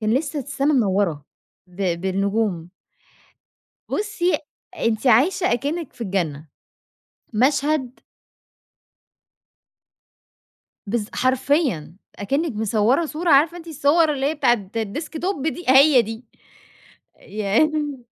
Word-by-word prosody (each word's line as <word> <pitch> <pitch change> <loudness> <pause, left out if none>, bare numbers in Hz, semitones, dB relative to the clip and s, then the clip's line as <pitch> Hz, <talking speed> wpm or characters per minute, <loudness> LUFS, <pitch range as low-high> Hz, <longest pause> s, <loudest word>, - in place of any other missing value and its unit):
كان 215 +1 +1
لسّه 295 +2 -1
السما 285 +2 -1
منورة 190 - +1 0.4
ب 180 -2 -3
بالنجوم. 195 -2 -1 1.2
بُصّي 410 -4 0 0.4
أنت 230 -1 0
عايشة 330 - +3
أكنّك 290 +6 -3
في - - -14
الجنة. 165 -8 -2 0.9
مشهد 265 +2 +1 2.9
بالض 215 +1 -2
حرفيًا، 255 - 0 0.2
أكنّك 275 +10 -1
مصوَّرة 220 +8 +1
صورة 320 +3 -3
عارفة 310 +4 +4
أنتِ 335 - -12
الصور 305 +1 +2
اللي 270 -1 -2
هي 305 +3 0
بتاعة 235 -9 +1
الديسك 230 +9 -4
توب 350 -6 -2
دي؟ 350 +2 -4
هي 270 0 +7
دي. 225 +2 -8 1.0
ين 275 +7 -1
260 Hz, 100 wpm, -22 LUFS, 205-305 Hz, 2.9 s, هي